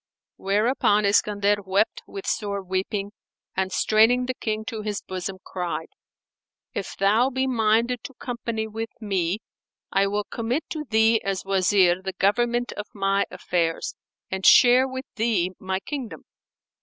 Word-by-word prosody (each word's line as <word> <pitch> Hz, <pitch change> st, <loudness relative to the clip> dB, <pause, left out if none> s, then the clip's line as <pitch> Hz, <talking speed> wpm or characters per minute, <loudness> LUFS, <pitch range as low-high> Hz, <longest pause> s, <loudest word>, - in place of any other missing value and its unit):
Whereupon 210 Hz, +1 st, +2 dB
Iskandar 205 Hz, 0 st, +2 dB
wept 195 Hz, +4 st, +1 dB
with 195 Hz, -1 st, -8 dB
sore 200 Hz, -2 st, -2 dB
weeping 195 Hz, +2 st, -2 dB, 0.4 s
and 190 Hz, 0 st, -1 dB
straining 225 Hz, +5 st, +4 dB
the 255 Hz, -, -2 dB
King 220 Hz, -3 st, -3 dB
to 220 Hz, -1 st, -4 dB
his 210 Hz, -1 st, -3 dB
bosom 185 Hz, 0 st, -5 dB
cried, 180 Hz, -2 st, -4 dB, 0.8 s
"If 200 Hz, -, -5 dB
thou 215 Hz, +6 st, +3 dB
be 260 Hz, 0 st, -1 dB
minded 230 Hz, 0 st, +1 dB
to 270 Hz, -, -8 dB
company 230 Hz, -3 st, -4 dB
with 225 Hz, +1 st, -5 dB
me, 195 Hz, -2 st, -1 dB, 0.5 s
I 195 Hz, 0 st, +3 dB
will 205 Hz, +1 st, -1 dB
commit 240 Hz, +8 st, -2 dB
to 305 Hz, -2 st, -4 dB
thee 220 Hz, -1 st, +3 dB
as 195 Hz, -1 st, -2 dB
Wazir 185 Hz, -2 st, +3 dB
the 190 Hz, 0 st, -4 dB
government 240 Hz, +6 st, +1 dB
of 210 Hz, -, -6 dB
my 195 Hz, 0 st, +1 dB
affairs 165 Hz, -2 st, -1 dB, 0.4 s
and 190 Hz, 0 st, -3 dB
share 250 Hz, +4 st, +7 dB
with 260 Hz, 0 st, -6 dB
thee 215 Hz, -6 st, +1 dB
my 190 Hz, 0 st, -2 dB
kingdom." 235 Hz, -, -6 dB
210 Hz, 145 wpm, -24 LUFS, 195-235 Hz, 0.8 s, share